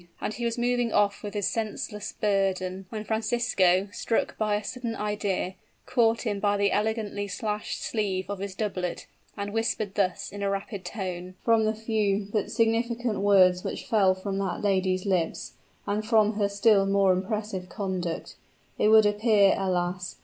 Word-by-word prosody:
And - - -3
he 240 - -4
was 235 +1 -1
moving 245 -1 +1
off 205 -1 +2
with 205 0 -6
his 205 -2 0
senseless 210 -1 -3
burden, 190 -2 -1
when 215 -2 -5
Francisco, 220 -4 +2
struck 225 - -1
by 215 -1 0
a 210 - -2
sudden 235 0 -4
idea, 205 -3 -2 0.3
caught 230 -2 +2
him 210 -4 -1
by 205 0 +2
the 200 0 +2
elegantly 210 -1 -1
slashed 210 +2 -3
sleeve 195 -4 -1
of 200 -1 -4
his 195 -1 -5
doublet, 190 -4 -3 0.3
and 200 0 -4
whispered 225 -3 -1
thus, 185 -3 -1
in 205 +1 -7
a 200 - 0
rapid 200 0 -4
tone: 185 -3 -5
"From 225 -1 +4
the 215 +1 0
few, 210 -2 0
but 210 -2 -1
significant 230 -1 0
words 185 -3 +5
which - - -4
fell 195 -4 +3
from 195 +1 -4
that 190 -1 -2
lady's 185 -2 +1
lips, 180 -4 -1 0.3
and 205 +1 -1
from 215 -1 +3
her 205 -1 0
still 200 -1 +4
more 195 -1 +4
impressive 190 -1 -3
conduct, 185 -5 -4 0.4
it - - +4
would 220 0 +7
appear, 205 -1 +4
alas! 180 -1 -2
205 Hz, 165 wpm, -27 LUFS, 190-220 Hz, 0.4 s, would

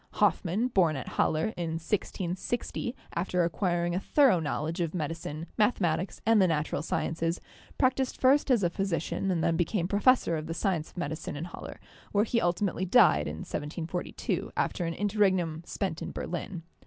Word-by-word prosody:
Hoffmann, 205 +8 +2
born 175 -9 +3
at 135 - -5
Halle 160 +8 +1
in 170 -2 -3
1660, 190 +7 -2 0.2
after 180 +1 0
acquiring 175 0 0
a 180 - +1
thoro 260 - +4
knowledge 160 +2 -2
of 165 0 -2
medi 160 -2 -1
cine, 160 -1 -6
mathematics 190 -5 +1
and 225 -1 +5
the 185 - +5
natural 155 -3 0
sciences, 165 +2 -1 0.4
practised 260 0 +1
first 275 +3 +4
as 240 -6 +4
a 175 - +2
physician 190 0 -1
and 170 -3 +1
then 170 -1 +2
became 175 +1 0
professor 205 -3 +3
of 155 0 -5
the 165 - -4
science 170 -5 -1
of - - -22
medicine 155 -3 -4
in 150 +3 -4
Halle, 175 - -8 0.4
where 205 0 +4
he 230 +1 +1
ultimately 175 +1 0
died 200 +2 +5
in - - -5
1742, 165 +3 -3
after 175 - 0
an 165 0 -2
interregnum 190 -6 +1
spent 185 -5 -3
in - - -4
Berlin. 175 0 -5
175 Hz, 165 wpm, -29 LUFS, 165-205 Hz, 0.4 s, and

